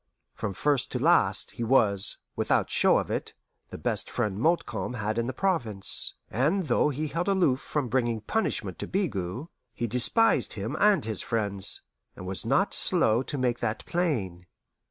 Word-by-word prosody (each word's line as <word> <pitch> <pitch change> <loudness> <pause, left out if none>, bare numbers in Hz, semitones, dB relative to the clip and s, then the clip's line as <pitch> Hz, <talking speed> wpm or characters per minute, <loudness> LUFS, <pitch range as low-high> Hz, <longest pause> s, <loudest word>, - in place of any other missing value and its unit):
From 100 - -4
first 145 +1 0
to - - 0
last, 125 - +2
he 120 - -5
was, 105 -5 +3 0.2
without - - 0
show - - +4
of - - -2
it, - - -3 0.3
the - - -8
best - - -2
friend 100 -1 -2
Montcalm 120 - 0
had 110 0 -2
in 115 - -1
the - - -1
province; 125 - -1 0.2
and 150 - +1
though 150 0 +2
he 150 +2 -3
held 170 +5 -2
aloof 180 -10 +2
from 145 -4 -2
bringing 120 -2 0
punishment 220 - -2
to - - -4
Bigot, 125 - -2 0.3
he 120 - -2
despised 125 - +3
him 110 +7 -4
and 205 - +4
his 110 -3 +1
friends, 100 -4 0 0.3
and 90 - -9
was 95 +4 -5
not 140 - +2
slow 120 - +3
to 145 +2 -5
make 125 -2 0
that 115 -2 -3
plain. 105 - -2
125 Hz, 170 wpm, -27 LUFS, 105-155 Hz, 0.3 s, show